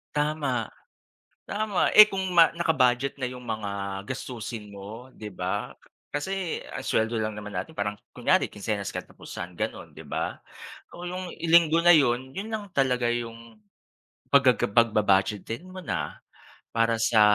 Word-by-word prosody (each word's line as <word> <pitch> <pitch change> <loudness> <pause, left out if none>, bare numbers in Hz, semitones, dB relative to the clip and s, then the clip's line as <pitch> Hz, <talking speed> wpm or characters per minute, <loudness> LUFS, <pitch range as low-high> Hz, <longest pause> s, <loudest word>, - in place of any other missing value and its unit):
Tama. 145 -6 0 0.8
Tama 210 -2 0
eh, 215 - +13
kung 190 -1 -2
ma 165 -1 +8
naka-budget 135 -6 +2
na - - -1
yung 125 0 -9
mga 100 -3 -4
gastusin 115 -4 -6
mo 105 +6 -9
di 105 - -7
ba? 95 +3 -3 0.4
Kasi 180 +4 -2
ang - - -4
sweldo 115 +1 +1
lang 110 -1 -2
naman 105 0 -7
natin 95 - -4
parang 105 0 -2 0.2
kunyari - - +2
kinsenas 105 -1 -3
katapusan 90 +1 -7
ganun, - - -4
di - - -9
ba? - - -3 0.6
Oo 175 - -8
yung 180 0 -5
Linggo 165 0 +5
na 175 - +9
yun 130 -3 +3
yun 205 +3 -4
lang 210 -2 -4
talaga 125 -3 +2
yung 115 -2 -6 0.7
paggaga 140 -3 +5
pagba-budgetin 105 - +2
mo 185 - -9
na. - - -3 0.6
Para 115 0 +2
sa 110 -3 +4
120 Hz, 140 wpm, -26 LUFS, 105-155 Hz, 0.8 s, eh